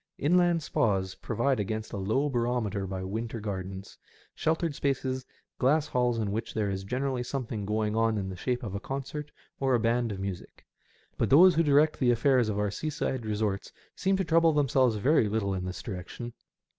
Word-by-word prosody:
Inland 175 +1 +3
spas 100 -12 0
provide 120 +3 -1
against 110 +2 -3
a - - -3
low 110 +9 +1
barometer 120 -6 -1
by 95 0 -4
winter 115 +4 -4
gardens, 95 -2 -6 0.3
sheltered 160 0 0
spaces, 130 -2 -2 0.3
glass 145 +4 +3
halls 125 -1 +1
in 105 -3 -1
which 110 +2 -4
there 105 -2 0
is 95 0 -3
generally 130 +4 -2
something 120 -5 -4
going 105 0 0
on 115 -1 +2
in 95 -2 -2
the 95 - -6
shape 125 +7 -2
of 105 -5 -5
a 100 - -2
concert 140 +4 -5 0.3
or 135 -2 +2
a - - +2
band 115 0 +1
of 95 - -5
music. 95 -2 -6 0.5
But - - +1
those 175 +7 +8
who 165 - +3
direct 150 0 +3
the 125 - +3
affairs 120 -1 +3
of 105 - -2
our 105 -1 0
seaside 130 -3 -3
resorts 105 -2 -2 0.2
seem 195 0 +1
to 190 - 0
trouble 165 0 +4
themselves 130 -5 +3
very 120 0 +3
little 100 -2 0
in 90 -1 -3
this 90 -1 -6
direction. 110 +5 -6
120 Hz, 185 wpm, -29 LUFS, 105-140 Hz, 0.5 s, those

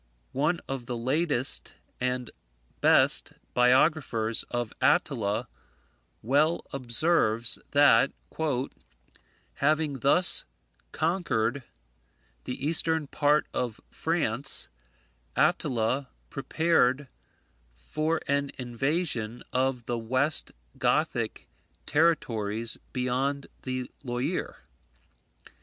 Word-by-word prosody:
One 150 +6 0
of 135 -3 -5
the 120 -2 -3
latest 135 +2 +1 0.2
and 125 -1 -2 0.5
best - - +4 0.2
biographers 125 -3 +2
of 120 -2 -3
Attila 120 - +1 0.8
well 145 +8 +1
observes, 120 -3 +2
that, 140 -3 +4 1.5
"having 150 -1 0
thus 160 +7 +6 0.5
conquered 140 -7 -1 0.8
the 125 +2 -5
eastern 160 0 +2
part 145 +1 +1
of 120 -4 -3
France, 140 -6 0 0.7
Attila 125 +3 0 0.2
prepared 145 -2 +1 0.7
for 155 - -2
an 140 0 0
invasion 125 -2 -2
of 130 -2 -1
the 120 -1 -3
West 130 +6 +2 0.3
Gothic - - -1 0.4
territories 115 -9 0 0.2
beyond 130 +2 -2 0.2
the 130 -1 -5
Loire. 130 +7 -4
135 Hz, 75 wpm, -27 LUFS, 120-150 Hz, 1.5 s, thus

